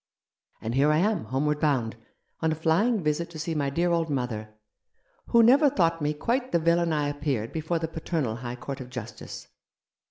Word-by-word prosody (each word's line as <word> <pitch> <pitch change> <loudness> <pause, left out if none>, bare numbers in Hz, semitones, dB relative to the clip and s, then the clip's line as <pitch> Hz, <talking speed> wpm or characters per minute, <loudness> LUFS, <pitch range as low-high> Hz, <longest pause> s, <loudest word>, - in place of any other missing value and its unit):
And 110 - -3
here 140 +4 +4
I 150 - +3
am, 205 - +1
home 130 +6 -1
ward 150 0 +1
bound, 130 -8 +1 0.4
on 160 -1 +1
a - - 0
flying 175 +7 +2
visit 155 +3 0
to 170 - -9
see 165 +1 -3
my 145 -3 0
dear 170 +5 +1
old 165 -1 +1
mother, 125 -6 -2 0.8
who 235 -1 +5
never 280 +6 +6
thought 165 - +1
me 150 0 +1
quite 250 - -1
the - - +4
villain 170 0 +2
I 150 -2 +1
appeared 145 -6 -2
before 160 +1 -1
the 160 0 -2
paternal 155 -7 -2
high 120 0 -5
court 135 +2 -6
of 125 - -8
justice. 120 -3 -8
155 Hz, 195 wpm, -27 LUFS, 135-170 Hz, 0.8 s, never